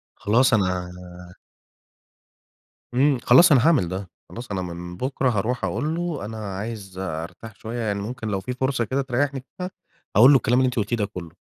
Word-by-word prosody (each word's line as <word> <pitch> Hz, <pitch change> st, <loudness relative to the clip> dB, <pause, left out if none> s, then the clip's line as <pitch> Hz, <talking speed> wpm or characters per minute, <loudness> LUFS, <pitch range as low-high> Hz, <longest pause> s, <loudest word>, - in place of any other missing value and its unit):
خلاص 125 Hz, +5 st, +3 dB
أنا 90 Hz, -4 st, +1 dB, 2.0 s
إمم، 135 Hz, +2 st, +3 dB
خلاص 160 Hz, +8 st, +7 dB
أنا 130 Hz, -4 st, +5 dB
هاعمل 155 Hz, -, +4 dB
ده. 95 Hz, +1 st, -5 dB, 0.2 s
خلاص 120 Hz, -1 st, -8 dB
أنا 95 Hz, -2 st, -2 dB
من 90 Hz, 0 st, -7 dB
بُكره، 130 Hz, +3 st, 0 dB
هاروح 120 Hz, +2 st, -1 dB
أقول 155 Hz, +2 st, -2 dB
له 170 Hz, -, -3 dB
أنا 110 Hz, +1 st, -6 dB, 0.2 s
عايز 100 Hz, -3 st, -6 dB
أرتاح 95 Hz, +4 st, -6 dB
شوية 115 Hz, +2 st, -6 dB
يعني 105 Hz, -3 st, -1 dB
ممكن 115 Hz, +2 st, -5 dB
لو 100 Hz, -2 st, -1 dB
في 110 Hz, +7 st, -4 dB
فرصة 130 Hz, -1 st, 0 dB
كده 135 Hz, +4 st, -1 dB
تريّحني 135 Hz, +1 st, -1 dB
فيها، 180 Hz, 0 st, -4 dB, 0.4 s
هاقول 120 Hz, +7 st, +8 dB
له 140 Hz, -, +7 dB
الكلام 125 Hz, 0 st, +2 dB
اللي 130 Hz, -, +3 dB
أنتِ 125 Hz, -, -2 dB
قُلتيه 115 Hz, 0 st, 0 dB
ده 105 Hz, -3 st, 0 dB
كلّه 90 Hz, -5 st, -8 dB
115 Hz, 180 wpm, -23 LUFS, 100-130 Hz, 2.0 s, هاقول